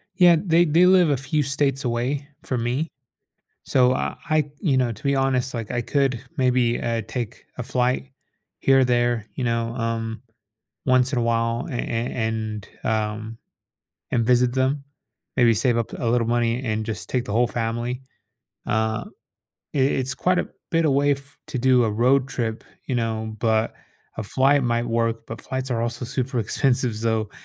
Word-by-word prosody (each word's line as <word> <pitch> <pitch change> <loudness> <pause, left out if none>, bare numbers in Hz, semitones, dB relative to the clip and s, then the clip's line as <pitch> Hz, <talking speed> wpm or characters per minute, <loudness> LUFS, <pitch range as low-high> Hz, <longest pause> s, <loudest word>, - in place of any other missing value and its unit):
Yeah, 175 -2 +7
they 170 -1 +4
they 170 +4 +5
live 180 -3 +6
a 140 - +2
few 145 +3 0
states 140 -1 0
away 125 +4 -1 0.2
from 125 -3 -2
me. 130 +7 -1 0.8
So, 130 -1 +3
I - - -2
I 155 -2 +2
you 140 -8 +2
know, 125 -3 +2
to - - -12
be 140 -1 +2
honest, 130 -1 +1
like, 115 -3 -4
I 120 -1 0
could 135 -2 0
maybe, 125 -2 +2
uh, 115 -1 -1
take 120 -2 -5
a - - -2
flight 125 +1 0 0.5
here 135 0 +5
or - - +5
there, 120 -3 +1
you 130 - -3
know, 115 0 -1
um, 115 -1 -3 0.6
once 130 0 +3
in 125 - +2
a - - +1
while 115 +1 0
an 125 -6 -4
an 115 +1 -2
and, 110 -2 -3 0.2
um 110 0 -2 0.7
and 115 -2 +2
visit 125 0 +3
them. 135 +2 +1 0.5
Maybe 120 -2 +5
save 115 +2 +2
up 115 - -2
a - - -3
little 115 0 +2
money 120 +1 +1
and 110 -2 -1
just 110 - -5
take 125 -2 0
the 105 - -4
whole 120 +1 +3
family. 120 +2 -2 0.7
Uh, 110 0 0 0.7
i - - 0
it's 130 -1 +1
quite 180 +6 +1
a - - 0 0.2
bit 165 -1 +2
away 145 0 +3
f 140 +1 -7
to 130 - -3
do 125 -1 +4
a 110 - +1
road 125 +5 +3
trip, 115 -4 -3 0.2
you 130 - -2
know, 110 -2 -2
but 110 0 +1 0.4
a - - -1
flight 135 +6 +3
might 120 0 0
work, 115 0 -1
but 115 - -7
flights 130 0 -4
are 115 -1 0
also 120 +1 -3
super 130 0 -2
expensive, 120 +1 +1
so, 110 -1 0
120 Hz, 180 wpm, -23 LUFS, 115-135 Hz, 0.8 s, Yeah